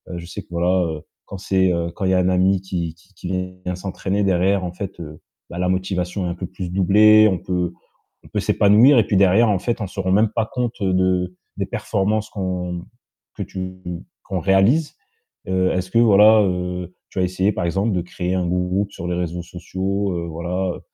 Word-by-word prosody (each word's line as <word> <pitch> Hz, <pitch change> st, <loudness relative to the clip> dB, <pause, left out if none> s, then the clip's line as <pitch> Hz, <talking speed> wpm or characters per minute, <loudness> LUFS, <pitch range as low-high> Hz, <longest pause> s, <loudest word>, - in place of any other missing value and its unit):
je 85 Hz, 0 st, -7 dB
sais 95 Hz, +3 st, -7 dB
que, -, -, -31 dB
voilà, 90 Hz, +1 st, +1 dB
heu, 75 Hz, -, -11 dB, 0.2 s
quand 100 Hz, -, -8 dB
c'est, 95 Hz, -1 st, +1 dB
heu, 85 Hz, 0 st, -2 dB
quand 95 Hz, -, -4 dB
il 95 Hz, -, +2 dB
y -, -, +3 dB
un 90 Hz, 0 st, +3 dB
ami 95 Hz, +1 st, +2 dB
qui 85 Hz, -4 st, -4 dB
qui 90 Hz, +4 st, -26 dB
qui 90 Hz, -, -9 dB, 0.4 s
vient 90 Hz, 0 st, -2 dB
s'entraîner 95 Hz, +2 st, -2 dB
derrière, 95 Hz, +1 st, +2 dB
en 90 Hz, -, -3 dB
fait, 95 Hz, -2 st, -7 dB, 0.5 s
bah, 85 Hz, -, -7 dB
la 90 Hz, -, 0 dB
motivation 95 Hz, 0 st, -2 dB
est -, -, -2 dB
un 85 Hz, -, -4 dB
peu 90 Hz, +1 st, -5 dB
plus 90 Hz, 0 st, -6 dB
doublée, 110 Hz, +3 st, +6 dB
on 95 Hz, -3 st, -1 dB
peut 90 Hz, -1 st, -2 dB, 0.5 s
on -, -, -15 dB
peut -, -, -2 dB
s'épanouir 115 Hz, +7 st, +5 dB
et 110 Hz, -, +4 dB
puis, 100 Hz, -, 0 dB
derrière, 100 Hz, +4 st, +5 dB
en 100 Hz, -, +2 dB
fait, 115 Hz, +4 st, -2 dB
on 105 Hz, -, -2 dB
se -, -, -14 dB
rend 95 Hz, 0 st, 0 dB
même 105 Hz, +2 st, +3 dB
pas 115 Hz, -2 st, 0 dB
compte, 120 Hz, -1 st, -2 dB
heu, 95 Hz, -2 st, +1 dB
de 90 Hz, -1 st, +1 dB, 0.2 s
des -, -, -1 dB
performances 105 Hz, +2 st, -1 dB
qu'on, 90 Hz, -3 st, -3 dB
mmh, 85 Hz, 0 st, -6 dB, 0.5 s
que -, -, -4 dB
tu 95 Hz, 0 st, -6 dB, 0.5 s
qu'on 95 Hz, -, -3 dB
réalise, 100 Hz, -, +3 dB, 0.5 s
heu, 95 Hz, 0 st, +1 dB
est-ce 90 Hz, 0 st, -2 dB
que, 115 Hz, -, +2 dB
voilà, 110 Hz, -1 st, +6 dB
heu, 90 Hz, -1 st, -3 dB, 0.2 s
tu -, -, -7 dB
as -, -, +2 dB
essayé, 95 Hz, +3 st, +1 dB
par 90 Hz, -, -3 dB
exemple, 100 Hz, +6 st, 0 dB
de 90 Hz, -, +1 dB
créer 90 Hz, +1 st, -4 dB
un 90 Hz, -1 st, 0 dB
groupe 90 Hz, +3 st, -1 dB
sur 85 Hz, -, -7 dB
les 90 Hz, -, -1 dB
réseaux 85 Hz, 0 st, -3 dB
sociaux? 95 Hz, +3 st, -3 dB
Heu, 85 Hz, 0 st, -3 dB
voilà, 90 Hz, +3 st, -2 dB
heu -, -, -11 dB
95 Hz, 220 wpm, -21 LUFS, 90-100 Hz, 0.5 s, doublée